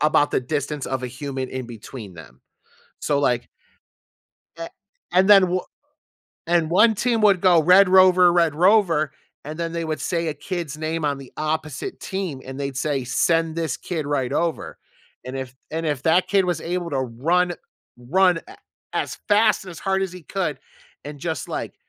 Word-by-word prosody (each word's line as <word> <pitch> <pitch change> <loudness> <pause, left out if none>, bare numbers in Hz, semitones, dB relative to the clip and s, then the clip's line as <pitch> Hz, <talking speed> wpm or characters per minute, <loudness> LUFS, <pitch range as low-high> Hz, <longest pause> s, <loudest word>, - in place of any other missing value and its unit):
about 150 0 +3
the - - +1
distance 145 +2 -3
of 130 -1 -3
a 125 - -2
human 130 +1 -5
in 130 -1 -5
between 110 -3 -10
them. 75 -7 -14 0.6
So 145 - 0
like 120 -3 0 1.1
eh, 165 0 -6 0.4
and 185 +2 +4
then 200 -2 +8
w 185 0 +1 0.9
And 170 -1 +1
1 220 +5 +5
team 230 +1 0
would 200 -4 +5
go 175 -3 +5
"Red 185 +4 +6
rover, 185 -1 +6
red 170 -3 +2
rover," 170 -4 +3 0.3
and 155 +2 -7
then 165 -1 -3
they 170 0 -3
would 155 -3 -3
say 170 +1 -1
a 150 - -3
kid's 160 -1 -5
name 160 +1 -3
on 145 -2 0
the 135 -2 -12
opposite 155 -3 -3
team 190 -8 -4
and 135 +1 -8
they'd 140 -1 -4
say, 135 -1 -1
"Send 165 +5 +1
this 160 -5 -2
kid 160 -5 -4
right 135 -4 -1
over," 170 -2 -2 0.5
and 130 +1 -6
if 130 -1 -6 0.2
And 165 +1 -3
if 145 -4 -2
that 170 +4 +3
kid 195 -1 +3
was 175 -3 -1
able 175 0 -3
to 135 -3 -1
run 160 +9 0 0.5
run 175 +7 +2
a - - -12 0.4
as - - -2
fast 210 0 +4
and 185 - -9
as 165 - -10
hard 195 0 0
as 190 - -2
he 180 -1 -10
could 170 -7 -3 0.5
and 145 -1 -8
just, 160 -4 -4
like, - - -5
160 Hz, 185 wpm, -22 LUFS, 140-180 Hz, 1.1 s, then